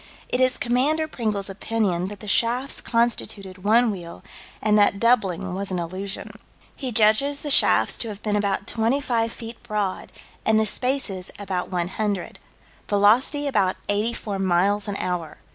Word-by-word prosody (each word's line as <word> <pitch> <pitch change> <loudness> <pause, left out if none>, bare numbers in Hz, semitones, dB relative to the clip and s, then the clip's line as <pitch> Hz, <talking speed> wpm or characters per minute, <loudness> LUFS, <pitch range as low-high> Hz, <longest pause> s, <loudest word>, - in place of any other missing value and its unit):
It 250 - 0
is 255 0 +3
Commander 285 +6 +1
Pringle's 215 -8 -2
opinion 195 -3 -1
that 205 -1 -9
the 210 - -8
shafts 240 +6 +1
constituted 205 -5 -1
one 225 +3 +4
wheel, 175 -4 -8 0.4
and 210 -1 +2
that 205 -1 +4
doubling 195 -6 +2
was 195 +1 -4
an 185 - -2
illusion. 185 +4 -4 0.4
He 260 -3 -4
judges 230 +6 +3
the 295 - -2
shafts 110 - +4
to - - -3
have 210 -1 -8
been 210 -1 0
about 200 -1 0
25 230 0 0
feet 230 0 -9
broad, 205 -3 -3 0.3
and 220 0 +3
the 220 - +2
spaces 215 -5 -1
about 190 -3 -3
100. 185 +2 -2 0.5
Velocity 225 +8 +3
about 205 -9 +1
84 205 -1 -1
miles 195 +3 +2
an 205 - -3
hour. 180 -4 -3
210 Hz, 150 wpm, -24 LUFS, 190-235 Hz, 0.5 s, one